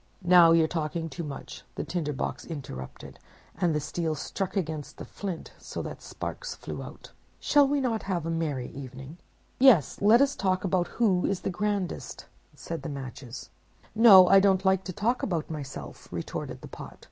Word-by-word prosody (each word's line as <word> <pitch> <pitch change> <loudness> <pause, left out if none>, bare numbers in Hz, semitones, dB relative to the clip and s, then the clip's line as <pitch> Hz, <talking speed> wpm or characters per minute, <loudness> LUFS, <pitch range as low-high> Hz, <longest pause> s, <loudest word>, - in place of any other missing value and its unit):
'—'Now 175 -1 +7
you're 165 -1 +5
talking 165 0 -3
too 150 +4 -6
much,' 145 -3 -8
the - - -3
Tinder 165 -4 -2
box 140 - -4
interrupted, 130 - -8 0.4
and 170 -4 +1
the - - +1
steel 160 +2 -2
struck 195 +6 -4
against 155 -5 -4
the - - -7
flint, 190 -5 -6
so - - -6
that - - -7
sparks - - -6
flew - - -7
out. - - -11 0.3
'Shall 290 -2 +4
we 285 +1 +1
not 235 -5 0
have 180 -5 -2
a 165 - -2
merry 150 -6 -2
evening?' 135 +4 -9 0.4
"'Yes, 245 - +5
let 215 +4 +6
us 280 0 +3
talk 185 -1 0
about 180 -2 +1
who 195 -6 +3
is 195 -2 -1
the - - -2
grandest,' 200 0 -3 0.3
said 165 +4 -6
the 165 - -5
Matches. 130 -2 -8 0.4
"'No, 205 -5 +9
I 195 - +7
don't 195 -1 +3
like 190 0 +3
to 185 - -4
talk 230 +7 0
about 165 -5 -2
myself,' 145 -3 -8
retorted - - -5
the - - -9
Pot. - - -10
175 Hz, 180 wpm, -27 LUFS, 150-195 Hz, 0.4 s, No